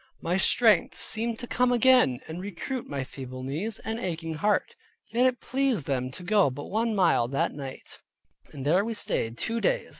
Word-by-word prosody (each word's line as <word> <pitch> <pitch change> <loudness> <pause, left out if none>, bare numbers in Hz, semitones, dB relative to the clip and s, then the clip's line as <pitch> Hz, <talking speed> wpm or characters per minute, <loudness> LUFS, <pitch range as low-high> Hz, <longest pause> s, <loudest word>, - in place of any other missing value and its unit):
My 175 - -1
strength 210 0 +3
seemed 230 +1 -1
to 245 - -6
come 250 +1 +2
again, 245 - +4
and 165 +3 -6
recruit 205 +7 -5
my 140 -2 -3
feeble 130 -1 -8
knees, 165 +12 -3
and 225 +1 -4
aching 165 -5 -3
heart. 205 +7 0 0.4
Yet 245 +3 +4
it 250 -1 -1
pleased 260 - 0
them 130 -2 -1
to 180 - -8
go 200 -3 +3
but 140 +3 -8
one 225 +1 0
mile 170 - +3
that 135 +2 -1
night, 135 -2 -8 0.5
and 135 -1 -7
there 175 +7 +3
we 230 +1 -3
stayed 115 - -2
two 230 +1 -2
days. - - 0
190 Hz, 185 wpm, -27 LUFS, 140-230 Hz, 0.5 s, again